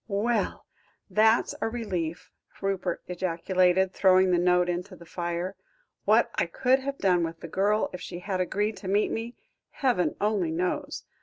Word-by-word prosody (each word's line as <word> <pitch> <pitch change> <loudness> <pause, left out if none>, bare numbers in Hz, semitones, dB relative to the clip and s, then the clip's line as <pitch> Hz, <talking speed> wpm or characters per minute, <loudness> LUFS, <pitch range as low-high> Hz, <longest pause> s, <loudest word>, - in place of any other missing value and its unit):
"Well! 225 +3 -1 0.5
that's 220 +2 +3
a - - 0
relief," 180 -8 -4 0.3
Rupert 190 -3 -2
ejaculated, 180 +1 +1
throwing 185 -1 +4
the 175 - +3
note 180 0 +3
into 180 +2 -3
the 170 - -14
fire; 175 +2 -3 0.5
"what - - +4
I - - 0
could 260 +1 +2
have 275 +1 -4
done 180 -3 +2
with 165 0 -5
the 170 - -6
girl 205 +5 +1
if 180 - -7
she 175 - -6
had 185 +1 -2
agreed 205 +3 -1
to 190 - -8
meet 205 +2 +2
me, 230 +2 -4 0.3
heaven 250 -10 0
only 205 -5 +1
knows. 180 - -2
185 Hz, 160 wpm, -27 LUFS, 175-210 Hz, 0.5 s, throwing